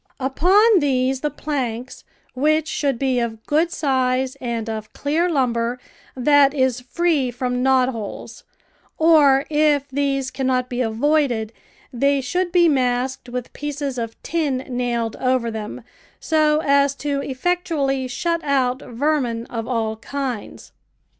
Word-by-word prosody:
Upon 370 - +4
these 265 -2 0
the 300 - 0
planks, 255 -5 -4 0.3
which 310 +4 +1
should 275 -5 -1
be 260 -1 +1
of 225 -2 -4
good 320 +3 +1
size 260 -4 0
and 235 -3 -3
of 220 -1 -5
clear 320 +5 0
lumber 245 -5 0 0.4
that 285 +2 +4
is 260 -3 +1
free 295 0 0
from 250 0 -2
knot 260 -1 +3
holes, 225 -5 -7 0.5
or, 295 -4 +5
if 295 -2 +2
these 275 -1 -1
cannot 255 -2 -1
be 245 0 -2
avoided, 240 -1 +1 0.4
they 275 +3 +2
should 350 +8 -1
be 345 -1 +5
masked 255 -2 0
with 250 0 -5
pieces 285 -3 -4
of 230 -1 -5
tin 285 -6 -1
nailed 240 -3 -2
over 255 -2 0
them, 220 +2 -6 0.4
so 310 -1 +2
as 280 -1 +3
to 280 -1 -2
effectually 280 -2 -1
shut 335 +6 -2
out 260 -3 +1
vermin 245 -3 -1
of 230 -1 -4
all 225 -3 -1
kinds. 255 -2 -5
265 Hz, 135 wpm, -21 LUFS, 245-295 Hz, 0.5 s, or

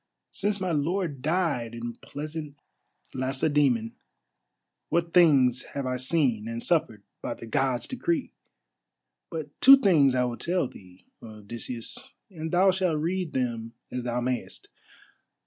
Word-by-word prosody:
since 205 0 -1
my 185 -2 -1
lord 160 -1 -1
died 145 -7 0
in 120 0 -5
pleasant 150 0 -7 0.6
Lacedæmon, 130 -3 +1 1.0
what 170 0 0
things 135 -8 +5
have 140 -1 -2
I 130 0 -1
seen 130 -5 +1
and 115 0 -4
suffered 115 - +1 0.2
by - - -3
the - - -10
Gods' 125 +2 0
decree! 285 +3 -2 1.0
But 160 -3 -5
two 275 +1 +10
things 155 - +4
I 125 - +3
will 120 -1 -2
tell 175 -4 0
thee, 90 -4 -16 0.2
Odysseus, 115 - -6 0.2
and 160 -3 -5
thou 190 +2 +5
shalt 185 -4 0
read 175 0 -2
them 115 -3 -2 0.2
as 125 -1 -3
thou 120 0 -1
mayest. 125 0 -4
140 Hz, 130 wpm, -27 LUFS, 120-170 Hz, 1.0 s, two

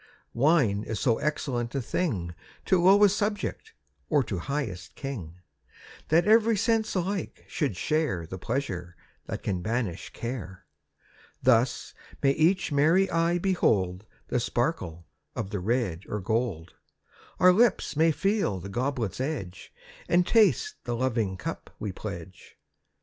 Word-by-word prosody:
Wine 130 -7 +3
is 110 -1 -4
so 115 -4 +2
excellent 125 -5 -2
a - - +1
thing 110 - -2 0.3
To 185 -2 +3
lowest 200 +2 +6
subject, 205 -1 -2 0.4
or 145 - +3
to 100 -6 -4
highest 110 - -4
king, 110 - -6 0.7
That 165 +3 +4
every 220 +1 +5
sense 225 +1 +1
alike 190 +2 -3
should 145 - -2
share 150 - 0
The 95 +3 -7
pleasure 90 -7 -3 0.3
that - - -5
can 90 -3 -1
banish 110 -3 -2
care. 115 -7 -6 0.8
Thus 125 -1 +2 0.3
may 135 - +5
each 165 +5 +2
merry 165 +7 +3
eye 170 +1 +2
behold 105 - +1 0.2
The 125 - +1
sparkle 115 - -2 0.3
of 105 -3 -4
the 100 - -2
red 100 -3 -1
or 105 - -2
gold. 110 -5 -2 0.7
Our 180 0 +7
lips 230 -5 +2
may 160 +2 +4
feel 195 - 0
the 95 +3 -8
goblet's 120 -2 -2
edge 110 - -5 0.4
And 175 +1 +4
taste 230 - +3
the 120 - -2
loving 115 -6 0
cup - - -6
we 105 - -4
pledge. 90 -2 -9
125 Hz, 135 wpm, -27 LUFS, -, 0.8 s, Our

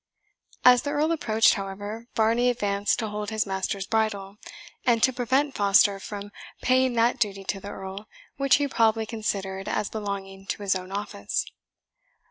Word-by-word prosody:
As 250 -1 +8
the 285 - -3
Earl 300 +2 +1
approached, 225 -9 +3
however, 205 +3 -6
Varney 230 +3 +3
advanced 205 -4 0
to 225 -3 -2
hold 210 0 -4
his 220 -1 0
master's 190 0 -2
bridle, 205 -3 -1 0.5
and 235 -3 +2
to 260 - +5
prevent 260 +3 +1
Foster 200 -1 +4
from 205 0 -7 0.3
paying 255 0 +3
that 235 +1 +2
duty 200 -4 -1
to 195 +1 -3
the 200 - -8
Earl 195 +1 -7 0.3
which 275 -1 +4
he 285 0 +1
probably 225 -3 +2
considered 195 -4 -3
as 210 - -1
belonging 195 -2 -5
to 205 - -3
his 195 -1 +2
own 185 0 -5
office. 195 - -3
210 Hz, 160 wpm, -26 LUFS, 195-235 Hz, 0.5 s, As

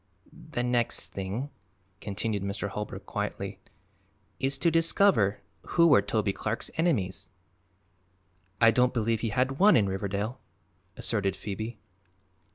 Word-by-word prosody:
"The 120 - 0
next 120 -1 0
thing," 100 +9 -4 0.5
continued 105 0 -2
Mr. 100 +1 -3
Holbrook 105 +1 -6
quietly, - - -4 0.8
"is 135 +1 0
to 170 +4 +2
discover 165 - +3 0.2
who 170 - +3
were 145 -10 +6
Toby 105 0 0
Clark's 110 +3 -3
enemies." 105 - 0 1.3
"I 115 0 +7
don't 125 +2 +2
believe 115 -1 +1
he 115 - -1
had 130 +5 0
one 210 +3 +7
in 105 -4 +4
Riverdale," 100 +5 -3 0.6
asserted 100 -4 0
Phoebe. 110 +3 -5
110 Hz, 120 wpm, -28 LUFS, 100-130 Hz, 1.3 s, I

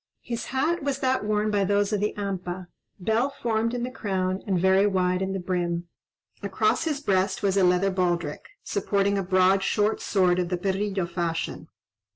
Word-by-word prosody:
His 235 -1 -4
hat 310 +7 0
was 280 -1 -1
that 260 -3 0
worn 210 0 0
by 205 -1 +2
those 205 +2 +1
of 210 - +1
the 210 +1 -1
Hampa, 185 -2 -4 0.3
bell 220 +8 +1
formed 230 -3 -1
in 240 - -2
the 250 - -3
crown, 190 -5 -2
and 190 -3 +1
very 190 +2 +4
wide 185 -2 +1
in 190 0 -1
the 195 - -2
brim. 175 -1 -2 0.5
Across - - +1
his 300 -3 -1
breast 190 -7 0
was 195 -1 +2
a 195 - +3
leather 180 +2 +3
baldric, 175 -5 -1
supporting 200 0 0
a - - -1
broad, 185 +1 +3
short 210 +2 +1
sword 185 -3 +2
of 175 -1 -1
the 180 - -1
perrillo 195 0 -1
fashion. 170 -2 -3
195 Hz, 185 wpm, -26 LUFS, 180-210 Hz, 0.5 s, very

